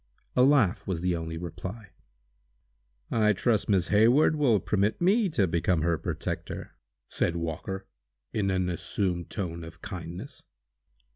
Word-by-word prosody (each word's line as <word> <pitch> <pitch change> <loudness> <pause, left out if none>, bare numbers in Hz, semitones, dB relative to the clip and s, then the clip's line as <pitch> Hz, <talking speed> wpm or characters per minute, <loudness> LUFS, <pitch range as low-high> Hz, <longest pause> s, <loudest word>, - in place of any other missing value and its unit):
A 125 - +4
laugh 130 -9 +3
was 90 -4 -2
the 90 -1 +1
only 80 0 -4
reply. 95 +4 -7 1.2
"I 105 -2 +4
trust 110 +2 +1
Miss 95 -4 +2
Hayward 120 +10 +5
will 130 -8 +3
permit 100 +3 0
me 200 +4 +3
to 115 - +2
become 85 -1 +1
her 85 -1 +1
protector!" - - -4 0.3
said 85 - 0
Walker, 85 +3 -4 0.5
in 100 -2 0
an 95 -1 +1
assumed 90 0 -2
tone 85 -4 -4
of 85 +1 -11
kindness. 95 - -7
95 Hz, 135 wpm, -28 LUFS, 85-110 Hz, 1.2 s, Hayward